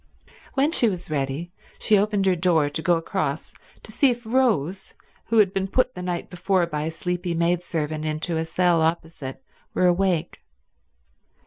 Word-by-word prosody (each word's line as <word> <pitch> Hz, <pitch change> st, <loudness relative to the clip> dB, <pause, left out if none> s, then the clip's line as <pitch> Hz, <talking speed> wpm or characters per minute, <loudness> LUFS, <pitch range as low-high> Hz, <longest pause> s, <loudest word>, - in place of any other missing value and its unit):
When 280 Hz, +3 st, +3 dB
she 240 Hz, -9 st, +4 dB
was 180 Hz, -4 st, -6 dB
ready 145 Hz, +4 st, -2 dB, 0.3 s
she 215 Hz, -, +3 dB
opened 205 Hz, -1 st, +2 dB
her 190 Hz, -1 st, +3 dB
door 165 Hz, -4 st, +2 dB
to 160 Hz, -, -3 dB
go 175 Hz, 0 st, +3 dB
across 165 Hz, -3 st, -3 dB, 0.3 s
to -, -, -9 dB
see 275 Hz, +5 st, +3 dB
if 240 Hz, -1 st, -3 dB
Rose, 210 Hz, -, 0 dB, 0.3 s
who 230 Hz, -, +1 dB
had 200 Hz, -3 st, +5 dB
been 195 Hz, 0 st, -1 dB
put 255 Hz, +5 st, +1 dB
the 180 Hz, -, -7 dB
night 180 Hz, -1 st, -3 dB
before 180 Hz, 0 st, +1 dB
by 150 Hz, -2 st, -3 dB
a -, -, -1 dB
sleepy 175 Hz, +1 st, -3 dB
maidservant 165 Hz, -3 st, -1 dB
into 155 Hz, +2 st, -2 dB
a 160 Hz, 0 st, -1 dB
cell 175 Hz, 0 st, +2 dB
opposite, 160 Hz, -4 st, -2 dB, 0.3 s
were 185 Hz, -, +3 dB
awake. 175 Hz, -2 st, +1 dB
175 Hz, 170 wpm, -24 LUFS, 160-195 Hz, 0.3 s, had